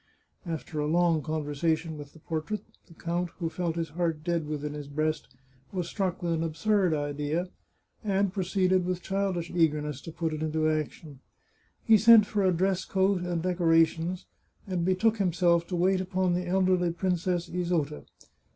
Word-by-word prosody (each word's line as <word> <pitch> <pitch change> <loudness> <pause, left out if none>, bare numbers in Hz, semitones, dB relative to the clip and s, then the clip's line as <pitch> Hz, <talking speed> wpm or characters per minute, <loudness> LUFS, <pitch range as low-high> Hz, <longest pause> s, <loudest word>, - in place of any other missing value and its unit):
After 160 -1 -4
a 150 - 0
long 170 0 +3
conversation 155 +1 -1
with 145 -1 -10
the 160 - -16
portrait, 165 +7 -4 0.2
the 165 - -17
count, 175 +1 -2
who 170 -2 -2
felt 170 -1 -2
his 165 -1 -2
heart 165 -1 -2
dead 170 -2 -1
within 150 -1 -4
his 145 -1 -7
breast, 155 +2 -1 0.4
was 180 -3 -3
struck 185 -1 -2
with 170 -1 0
an 160 - -1
absurd 170 +2 +1
idea, 145 +4 -2 0.5
and 200 -2 +1
proceeded, 185 -1 +1
with 180 0 -3
childish 190 -3 -1
eagerness, 150 -4 0
to 165 - -8
put 160 -1 -2
it 155 - -4
into 155 0 0
action. 155 -2 -3 0.6
He 220 -2 +6
sent 225 0 +8
for 205 0 -1
a 185 - +4
dress 185 +2 +1
coat 190 -1 +1
and 175 -2 -2
decora 170 -3 +4
tions, 170 +3 -5 0.4
and 185 -3 -2
betook 190 +5 +2
himself 170 -3 +2
to 180 - -3
wait 185 +2 +2
upon 185 -1 0
the 180 0 -2
elderly 185 -1 +2
Princess 175 0 -1
Isota. 170 -4 -2
170 Hz, 170 wpm, -28 LUFS, 155-185 Hz, 0.6 s, sent